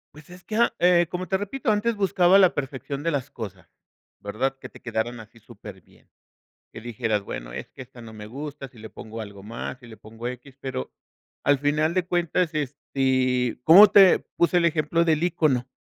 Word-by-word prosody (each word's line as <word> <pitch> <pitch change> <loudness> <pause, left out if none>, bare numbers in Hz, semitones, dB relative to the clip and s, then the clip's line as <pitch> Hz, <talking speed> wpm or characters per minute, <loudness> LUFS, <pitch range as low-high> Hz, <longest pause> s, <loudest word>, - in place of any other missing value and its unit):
Pues 150 +3 -15
es 180 0 -13
que, 215 - -5 0.2
eh, 175 -1 +4
como 185 0 -5
te 190 - +1
repito, 220 +4 -2
antes 215 +2 0
buscaba 190 -1 +4
la 185 -2 +4
perfección 140 +1 -5
de 165 - 0
las 140 -1 -3
cosas, 95 -7 -9 0.5
¿verdad?, 130 +7 -3
que - - -9
te - - -17
quedaran 115 0 -3
así 110 +1 -14
superbién, 115 -1 -15 0.6
que - - -9
dijeras, 110 -2 -2
bueno, - - -7
es - - -7
que - - -12
esta 125 -1 -13
no 110 -1 -11
me 105 -1 -10
gusta, 140 +2 -8
si 120 -5 -18
le 110 - -10
pongo 115 +1 -10
algo 100 -2 -9
más, 115 +3 -7
si 120 - -15
le 110 - -13
pongo 115 +2 -9
x, 130 +2 -11
pero, 130 -1 -5 0.5
al 145 -1 +3
final 155 +3 +1
de 185 -2 0
cuentas, 175 -1 0
este, 130 -4 -1
¿cómo 195 +6 +10
te 195 -3 +7 0.2
puse 175 +1 +3
el 170 - +3
ejemplo 165 +1 +1
del 160 -1 +1
ícono? 145 -7 +1
135 Hz, 195 wpm, -24 LUFS, 115-170 Hz, 0.6 s, cómo